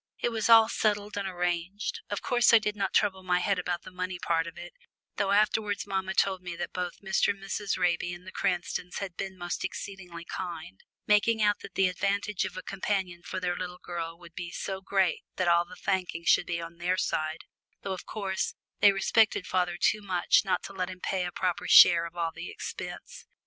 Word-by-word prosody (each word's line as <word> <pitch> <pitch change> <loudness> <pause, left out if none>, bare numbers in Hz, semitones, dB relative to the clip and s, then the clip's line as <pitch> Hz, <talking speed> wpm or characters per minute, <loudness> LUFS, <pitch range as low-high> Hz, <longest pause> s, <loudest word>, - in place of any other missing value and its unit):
It - - 0
was 225 -1 -1
all 225 -1 +9
settled 210 -2 0
and 200 -1 -2
arranged 180 - -2
of - - -3
course 240 -1 +5
I - - +11
did 210 -1 -1
not 195 -2 -1
trouble 195 -3 +2
my 180 -1 +1
head 190 +1 +1
about 175 -1 -2
the - - -10
money 185 0 -4
part 165 -1 0
of 165 - -9
it, 175 0 -9 0.4
though 200 -1 +1
afterwards 210 0 +2
mamma 190 -1 -2
told 190 -2 +2
me 180 -1 -6
that - - -5
both 180 -1 -4
Mr. 190 - +2
and 200 - -1
Mrs. 195 +1 -2
Raby 175 +1 +1
and 175 +1 -9
the 185 - -8
Cranstons 180 0 -2
had 190 -3 -5
been 190 +1 -5
most 175 -1 -4
exceedingly 180 -4 -6
kind, 165 - -6 0.3
making 215 +1 +3
out 205 0 +3
that 190 - -11
the 195 - +4
advantage 200 +2 -1
of - - -6
a - - -6
companion 190 -3 -2
for 185 - -5
their 180 -1 -1
little 180 0 -5
girl 170 -2 -5
would 170 -1 -14
be 175 - -6
so 190 +2 -4
great 190 -2 +1
that 185 - 0
all 170 0 +4
the - - -12
thanking 180 -3 -2
should - - +4
be 170 -1 -1
on 165 0 -8
their 180 +2 0
side, 155 -2 -1 0.4
though, 195 - -2
of 185 - -8
course, 195 -3 -2 0.2
they 205 - +7
respected 195 0 +2
father 180 -2 0
too 215 - +2
much 185 -3 +3
not 195 - 0
to 195 - -8
let 185 -1 -2
him 185 -1 -8
pay 185 0 -1
a - - -6
proper 180 -1 -2
share 170 -1 +8
of 170 - -14
all 165 -1 -1
the - - -7
expense. - - -7
185 Hz, 215 wpm, -29 LUFS, 175-200 Hz, 0.4 s, I